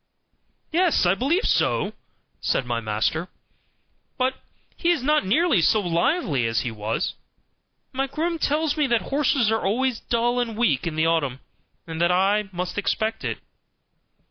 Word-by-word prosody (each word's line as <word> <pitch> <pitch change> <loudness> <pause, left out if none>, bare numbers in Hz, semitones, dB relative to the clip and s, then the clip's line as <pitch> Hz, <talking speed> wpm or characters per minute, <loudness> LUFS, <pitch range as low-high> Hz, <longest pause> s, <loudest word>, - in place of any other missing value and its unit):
"Yes, 340 - +3
I 175 - +4
believe 290 - +1
so," - - +1 0.5
said 130 - 0
my 120 -1 -1
master; 110 +10 -1 0.9
"but 255 0 +1 0.4
he 340 - 0
is 340 -7 +2
not 300 -7 +2
nearly 280 - +3
so 190 +7 +4
lively 170 - +1
as 115 0 0
he 120 - -3
was; 110 +1 -2 0.8
my 270 +1 -1
groom 325 +4 -2
tells 300 +1 +1
me 300 -3 +1
that 235 -3 +2
horses 275 -5 +1
are 225 - +1
always 240 +4 0
dull 240 +1 0
and 230 -3 -2
weak 170 - +1
in 160 - -3
the 160 +1 +2
autumn, 145 -6 0 0.5
and 165 0 -5
that 170 +1 +4
I 195 +3 +2
must 180 +2 -3
expect 220 +1 -1
it." - - -2
220 Hz, 155 wpm, -24 LUFS, 165-270 Hz, 0.9 s, I